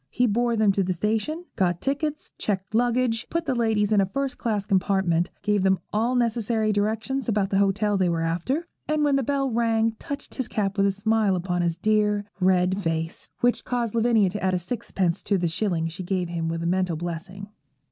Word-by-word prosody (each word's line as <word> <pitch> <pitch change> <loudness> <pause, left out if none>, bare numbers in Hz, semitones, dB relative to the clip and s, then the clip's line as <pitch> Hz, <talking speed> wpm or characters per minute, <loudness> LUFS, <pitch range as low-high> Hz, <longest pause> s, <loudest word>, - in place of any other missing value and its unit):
He 250 - +1
bore 235 +1 +1
them 215 -2 +4
to 195 - 0
the 185 0 0
station, 220 - -1
got 175 -2 +1
tickets, 300 +5 -2
checked 190 -1 -2
luggage, 240 0 +1
put 335 0 -1
the 275 - 0
ladies 220 -3 +1
in 205 -2 +5
a - - +2
first 275 +6 -3
class 210 -4 -1
compartment, 190 -3 +1
gave 205 -1 +2
them 190 0 +3 0.2
all 230 +4 +1
necessary 230 -2 +1
directions 220 +6 -1
about 205 -3 +1
the 195 - +3
hotel 200 +1 +2
they 185 -2 +3
were 165 -1 0
after, 180 - -1 0.2
and 305 0 +1
when 290 -2 +3
the 275 - +2
bell 275 0 0
rang 225 -1 +2
touched 285 0 -7
his 260 - -2
cap 200 -2 -1
with 200 -1 +3
a - - +2
smile 210 0 +1
upon 180 0 -1
his 170 -1 0
dear, 210 +1 +1
red 185 +1 +2
face, 165 -1 -3
which 245 0 +2
caused 240 -3 -2
Lavinia 225 -4 +3
to 205 0 -5
add 185 -1 +2
a - - +2
sixpence 185 -2 -2
to 200 - +1
the 175 -1 0
shilling 165 -1 -1
she 165 +3 -6
gave 180 -1 -2
him 165 -1 -2
with 165 0 -3
a - - -2
mental 180 -1 +1
blessing. 175 +4 -6
205 Hz, 210 wpm, -25 LUFS, 185-235 Hz, 0.2 s, in